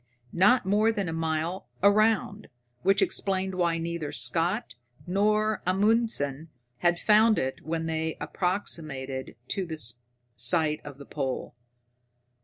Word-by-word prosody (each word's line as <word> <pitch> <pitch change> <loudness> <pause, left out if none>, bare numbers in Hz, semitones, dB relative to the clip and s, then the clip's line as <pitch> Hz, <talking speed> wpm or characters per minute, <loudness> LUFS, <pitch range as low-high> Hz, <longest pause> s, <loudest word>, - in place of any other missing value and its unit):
Not 205 +6 +4
more 210 +3 +3
than 200 -4 -2
a 165 - -3
mile 165 +3 -2 0.2
around, 215 0 +3 0.3
which 195 +1 +3
explained 190 0 0
why 170 -2 +1
neither 165 -2 -3
Scott 175 +8 -1 0.3
nor 210 +3 +1
Amundsen 185 - +1 0.3
had 175 0 +3
found 215 +3 +5
it 130 0 -2
when 165 +1 -2
they 160 0 -2
approximated 150 -6 -3
to 190 -2 -2
the 160 -1 -5 0.6
site 150 +6 +2
of 145 -2 -9
the 140 - -11
pole. 135 -3 -4
175 Hz, 120 wpm, -27 LUFS, 160-205 Hz, 0.6 s, found